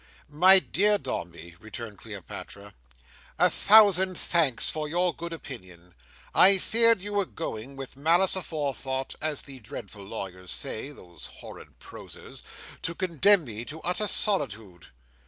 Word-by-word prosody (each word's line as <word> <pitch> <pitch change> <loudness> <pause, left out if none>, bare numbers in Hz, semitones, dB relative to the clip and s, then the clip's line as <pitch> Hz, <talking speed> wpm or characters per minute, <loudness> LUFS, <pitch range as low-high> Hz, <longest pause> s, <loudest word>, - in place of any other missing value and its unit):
"My 185 +6 +6
dear 205 +2 +2
Dombey," 85 - -7
returned 110 0 -9
Cleopatra, 100 -1 -10 0.6
"a - - +3
thousand 195 -3 +5
thanks 160 -8 +2
for 155 -1 -1
your 175 +3 0
good 170 0 -8
opinion. 90 - -11 0.4
I 195 +1 +7
feared 230 0 +3
you 205 0 -4
were 200 -1 0
going, 115 +2 -7
with 135 -1 -9
malice 170 +7 +2
aforethought, 140 -6 -4
as 155 -2 -2
the 135 -2 -11
dreadful 105 -2 -10
lawyers 95 -3 -8
say—those 90 - -6
horrid - - -13
prosers!—to 165 - -10
condemn 185 +2 +3
me 115 -1 -7
to 155 +5 -8
utter 180 +4 0
solitude." 110 - +1
145 Hz, 125 wpm, -26 LUFS, -, 0.6 s, I